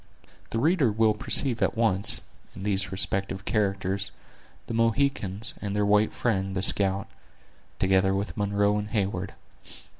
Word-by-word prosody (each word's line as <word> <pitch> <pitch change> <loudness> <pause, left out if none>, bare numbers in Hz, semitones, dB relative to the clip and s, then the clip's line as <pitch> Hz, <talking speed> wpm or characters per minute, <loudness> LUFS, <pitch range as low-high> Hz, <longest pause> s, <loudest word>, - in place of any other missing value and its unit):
The - - -3
reader 150 - +3
will 110 0 +3
perceive 120 +2 +2
at - - +1
once, 100 -4 +1 0.3
in 95 - -8
these 100 -1 -1
respective 95 0 -2
characters, 100 -2 0 0.6
the - - -6
Mohicans, 115 -3 0
and 100 -1 -3
their 105 0 +1
white 105 +1 +3
friend, 95 -5 -1
the 95 - 0
scout; 95 -1 +2 0.7
together 95 0 +2
with 100 +2 -3
Munro 100 0 +1
and 105 0 -5
Heyward. 95 -3 -2
100 Hz, 140 wpm, -26 LUFS, 95-110 Hz, 0.7 s, reader